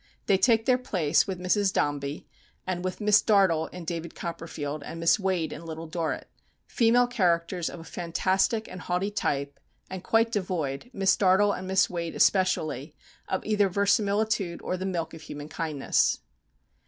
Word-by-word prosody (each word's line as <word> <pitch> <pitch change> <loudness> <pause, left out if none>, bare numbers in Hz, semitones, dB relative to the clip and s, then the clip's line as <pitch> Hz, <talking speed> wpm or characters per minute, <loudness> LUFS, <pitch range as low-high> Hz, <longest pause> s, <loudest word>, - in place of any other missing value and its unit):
They 195 -1 +3
take 225 -1 +3
their 255 -1 +3
place 170 -10 +1
with 190 -2 -4
Mrs. 190 +2 +2
Dombey 145 -1 -2 0.4
and 180 -1 -3
with 185 +3 -4
Miss 210 +1 +5
Dartle 190 -7 +3
in 180 -2 -9
"David 170 0 -5
Copperfield," 160 -4 -5
and 165 +3 -7
Miss 165 +6 +3
Wade 185 -5 -1
in 160 - -9
"Little 165 0 -7
Dorrit" 160 0 -3 0.4
female 245 0 +3
characters 175 -6 0
of 175 - -9
a - - -9
fantastic 190 +6 0
and 180 0 -9
haughty 180 +4 -1
type, 140 -7 -2 0.3
and 190 -1 -6
quite 225 +2 +2
devoid, 180 - -2
Miss 195 -5 +2
Dartle 200 +1 +4
and 185 - -6
Miss 190 0 +3
Wade 170 -2 -4
especially, 160 -6 +1 0.3
of 190 - -2
either 210 -2 +2
verisimilitude 200 -1 +1
or 185 - -2
the 185 +1 -3
milk 170 -3 -3
of 160 - -10
human 145 -1 -8
kindness. 155 -5 0
185 Hz, 165 wpm, -27 LUFS, 165-200 Hz, 0.4 s, Miss